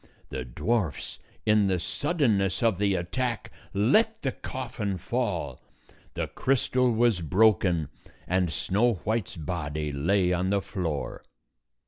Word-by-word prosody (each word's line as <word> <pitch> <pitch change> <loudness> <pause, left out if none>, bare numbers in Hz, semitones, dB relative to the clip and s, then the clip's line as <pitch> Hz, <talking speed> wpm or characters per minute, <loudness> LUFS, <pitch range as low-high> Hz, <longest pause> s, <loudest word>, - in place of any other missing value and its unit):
The 65 -1 -4
dwarfs, 85 - -2 0.3
in 105 -2 +4
the 95 -2 +1
suddenness 115 - +1
of 110 -5 +2
the 100 -1 +2
attack, 115 +7 -2 0.2
let 215 - +3
the 135 - +1
coffin 115 -8 -4
fall. 90 - -2 0.5
The - - -1
crystal 125 -1 +1
was 115 -4 +2
broken, 90 -2 +3 0.4
and 90 -2 +1
Snow 110 +8 +1
White's 110 -1 -1
body 75 -2 -3
lay 90 +6 +2
on 90 +1 0
the 100 0 +2
floor. 85 -7 -3
100 Hz, 120 wpm, -27 LUFS, 85-115 Hz, 0.5 s, in